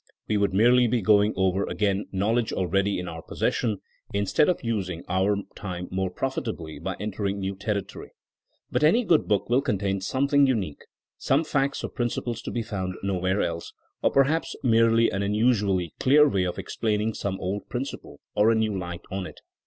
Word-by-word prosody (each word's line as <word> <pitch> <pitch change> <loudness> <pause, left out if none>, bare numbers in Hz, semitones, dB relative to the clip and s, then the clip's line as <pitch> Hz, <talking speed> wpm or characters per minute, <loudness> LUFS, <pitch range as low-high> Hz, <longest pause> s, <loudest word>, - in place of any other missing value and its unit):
We 110 - 0
would 100 -2 +2
merely 120 +5 +5
be 120 +1 +1
going 105 +1 +4
over 95 +1 +1
again 100 -1 0
knowledge 110 +4 0
already 95 +2 0
in 90 0 -4
our 80 -1 -6
possession, 105 +3 -1 0.3
instead 100 - +2
of 180 - 0
using 95 -7 -2
our 95 +3 +2 0.2
time 90 -3 -6
more 95 0 -1
profitably 110 -8 -4
by - - -4
entering 100 -1 -2
new 95 0 -2
territory. 100 0 -4 0.6
But - - +1
any 200 +11 +5
good 165 - +3
book 105 -2 +1
will 125 +3 +3
contain 100 -6 -1
something 140 +6 +3
unique; 100 - -1 0.4
some 140 +4 +2
facts 140 -2 -1
or - - -3
principles 120 -1 -2
to - - -6
be 120 - -2
found 95 -5 -4
nowhere 95 0 0
else; 85 -1 -4 0.3
or - - +3
perhaps 140 +4 +1
merely 115 -1 +4
an 100 - -2
unusually 100 -4 +1
clear 150 +3 +6
way 95 -9 +1
of 90 - -3
explaining 110 0 -1
some 95 -2 -3
old 95 +3 -4
principle, 130 +3 -6
or 105 +1 +4
a 115 - +4
new 110 -2 0
light 90 -2 -5
on 95 -1 -3
it. - - -12
105 Hz, 175 wpm, -26 LUFS, 95-120 Hz, 0.6 s, clear